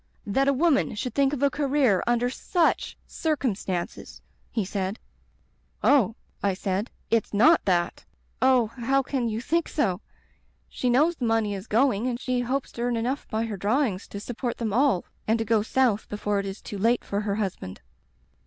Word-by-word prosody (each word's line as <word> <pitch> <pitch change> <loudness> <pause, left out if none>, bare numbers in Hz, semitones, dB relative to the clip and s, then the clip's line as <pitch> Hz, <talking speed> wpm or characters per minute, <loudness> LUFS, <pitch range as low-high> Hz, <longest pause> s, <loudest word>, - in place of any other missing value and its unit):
That 270 +7 +1
a 280 - +4
woman 285 -4 +2
should 250 +4 -3
think 275 -1 +3
of 285 -2 -2
a 280 - +4
career 275 -8 +2
under 240 0 +2
such 330 +6 0
circum 295 -8 -1
stances!' 185 -3 -5 0.3
he 220 -4 -1
said. 195 +1 -3 0.9
"*Oh,' 225 -6 +4 0.3
I 200 -2 +1
said, 195 +3 -2 0.2
'it's 225 -2 +1
not 310 +11 +5
that. 175 -2 0 0.4
Oh, 255 -2 +5
how 255 +4 0
can 255 -3 -1
you 220 0 -2
think 330 +7 0
so? 195 - 0 0.7
She 250 - -2
knows 305 +7 +3
the 245 - -2
money 225 -2 +1
is 195 +2 -6
going 235 -1 +2
and 240 -1 -2
she 255 -1 -1
hopes 260 +3 -2
to 235 - -7
earn 240 -1 0
enough 250 +5 -2
by 220 0 -1
her 215 -3 -4
draw 220 +10 +2
ings 200 -8 -3
to 200 - -7
support 240 +2 -4
them 220 -4 -2
all 255 -6 +2 0.2
and 220 +1 +3
to 225 - -2
go 225 -1 +3
South 225 -1 +1
before 210 -1 -1
it 200 - -3
is 195 +2 -7
too 205 - -6
late 235 +4 +2
for 200 +1 -2
her 205 -1 -1
husband.' 190 - -4
230 Hz, 190 wpm, -26 LUFS, 205-265 Hz, 0.9 s, not